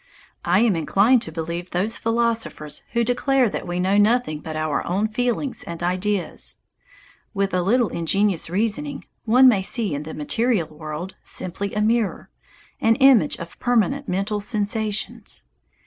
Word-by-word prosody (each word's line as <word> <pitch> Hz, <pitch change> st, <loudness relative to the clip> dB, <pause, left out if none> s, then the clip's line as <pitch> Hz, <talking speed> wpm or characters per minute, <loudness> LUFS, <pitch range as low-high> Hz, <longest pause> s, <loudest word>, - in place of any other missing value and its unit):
I 180 Hz, +4 st, +3 dB
am 225 Hz, -5 st, +3 dB
inclined 200 Hz, +9 st, +3 dB
to 160 Hz, -, -7 dB
believe 170 Hz, +2 st, -4 dB
those 195 Hz, +6 st, 0 dB
philosophers 225 Hz, -9 st, -1 dB
who 235 Hz, -, +2 dB
declare 250 Hz, +1 st, +2 dB
that 190 Hz, -, -5 dB
we 175 Hz, +1 st, -2 dB
know 190 Hz, +3 st, +2 dB
nothing 215 Hz, -7 st, +2 dB
but 155 Hz, +1 st, -7 dB
our 155 Hz, -1 st, -1 dB
own 195 Hz, +5 st, +1 dB
feelings 245 Hz, +4 st, -1 dB
and 170 Hz, 0 st, -6 dB
ideas. 185 Hz, +2 st, -2 dB, 0.8 s
With 195 Hz, -1 st, 0 dB
a 180 Hz, -, +2 dB
little 230 Hz, +5 st, +2 dB
ingenious 185 Hz, +1 st, 0 dB
reasoning 225 Hz, -, -1 dB, 0.2 s
one 250 Hz, +4 st, +6 dB
may 215 Hz, -6 st, +5 dB
see 205 Hz, -, -1 dB
in 145 Hz, -, -2 dB
the 155 Hz, +1 st, -7 dB
material 210 Hz, +3 st, 0 dB
world 155 Hz, +4 st, -7 dB
simply 195 Hz, +3 st, -3 dB
a 210 Hz, -, +1 dB
mirror, 225 Hz, -1 st, 0 dB, 0.5 s
an 225 Hz, 0 st, +3 dB
image 260 Hz, -, +5 dB
of 170 Hz, 0 st, -10 dB
permanent 245 Hz, +4 st, +1 dB
mental 195 Hz, +3 st, -1 dB
sensations. 210 Hz, 0 st, -3 dB
205 Hz, 150 wpm, -22 LUFS, 175-235 Hz, 0.8 s, one